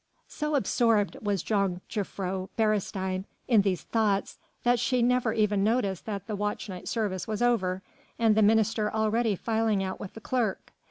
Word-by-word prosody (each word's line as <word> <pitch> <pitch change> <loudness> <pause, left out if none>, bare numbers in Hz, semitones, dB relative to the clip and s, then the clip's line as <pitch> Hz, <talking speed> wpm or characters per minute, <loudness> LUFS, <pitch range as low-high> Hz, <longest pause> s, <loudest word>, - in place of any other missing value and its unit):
So 300 0 -2
absorbed 225 - +2
was 200 -4 -1
Jongejuffrouw 195 -1 -2
Beresteyn 195 -3 0 0.2
in 230 -5 +5
these 195 -3 -1
thoughts 210 -3 0 0.2
that 245 0 +3
she 245 +1 +1
never 245 -1 +2
even 210 -2 +2
noticed 205 -4 0
that 200 -3 -4
the 215 -1 -3
watch 205 +1 -2
night 180 -2 -7
service 205 -5 -2
was 220 +2 -1
over, 190 -6 +1 0.3
and 225 -2 +4
the 220 - +3
minister 215 0 +3
already 220 0 +1
filing 220 -1 0
out 190 0 -4
with 195 - -8
the - - -7
clerk. 225 -3 -2
210 Hz, 160 wpm, -28 LUFS, 195-225 Hz, 0.3 s, in